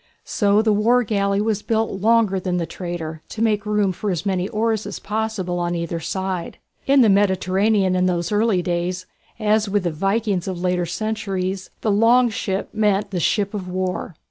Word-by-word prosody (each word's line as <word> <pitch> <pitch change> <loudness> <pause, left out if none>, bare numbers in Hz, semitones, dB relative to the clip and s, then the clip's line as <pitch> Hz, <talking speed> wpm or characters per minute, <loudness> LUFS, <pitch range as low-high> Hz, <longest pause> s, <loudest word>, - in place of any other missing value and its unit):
So 205 0 +2
the 220 -1 +3
war 235 +4 +3
galley 200 -2 0
was 215 -1 0
built 220 -4 -1
longer 220 -3 +3
than 180 -1 -2
the 170 - -1
trader, 165 -3 -6
to 220 - -6
make 210 -2 +1
room 210 -2 +2
for 205 +3 -4
as 175 -1 -2
many 190 -1 0
oars 220 0 -1
as - - -5
possible 210 -5 -3
on 175 0 -1
either 170 0 -3
side. 190 0 -4 0.3
In 275 0 +5
the 235 - +6
Mediterranean 195 0 +2
in 180 0 +2
those 175 -1 -1
early 210 -3 +2
days, 180 +1 -2 0.3
as 215 -1 +1
with 205 -1 +1
the 175 - 0
Vikings 195 +3 -1
of 185 -2 -3
later 180 -1 0
centuries, 195 -1 -3
the 215 - +1
"Long 235 +4 +4
Ship" 195 -2 -2
meant 205 -2 +1
the 180 - -1
ship 200 +4 +1
of 195 -3 -4
war. 185 -2 -3
195 Hz, 185 wpm, -21 LUFS, 180-215 Hz, 0.3 s, the